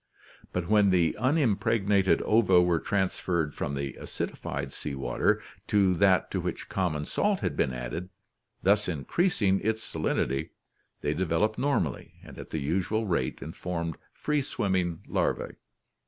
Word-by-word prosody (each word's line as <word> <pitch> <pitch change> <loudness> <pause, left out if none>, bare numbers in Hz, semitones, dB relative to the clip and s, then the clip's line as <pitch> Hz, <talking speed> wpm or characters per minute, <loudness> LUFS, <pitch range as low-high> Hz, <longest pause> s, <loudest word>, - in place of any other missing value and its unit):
But 90 -1 -2
when 105 -1 +5
the 85 -4 +3
unimpregnated 110 -7 +2
ova 105 -5 +5
were 90 -2 +3
transferred 90 -5 0
from 70 - -3
the 70 0 -3
acidified 70 0 -4
sea 75 -2 -4
water 65 - +1 0.2
to 100 -3 +4
that 95 0 +3
to - - -1
which - - -4
common 75 -6 -1
salt 205 - 0
had - - -1
been 65 - +1
added, 65 +9 -5 0.5
thus 100 +1 +3
in 75 -6 -4
creasing 110 - +2
its 110 +1 -1
salinity, 70 +2 -1 0.5
they 75 - 0
developed 95 +6 0
normally 130 - -1
and - - -11
at - - -8
the - - -3
usual 95 +9 0
rate 85 -10 -1
and 80 - -8
formed 85 -2 -3 0.2
free 150 -1 -1
swimming 95 -9 -1
larvae. - - -1
90 Hz, 145 wpm, -28 LUFS, 80-105 Hz, 0.5 s, when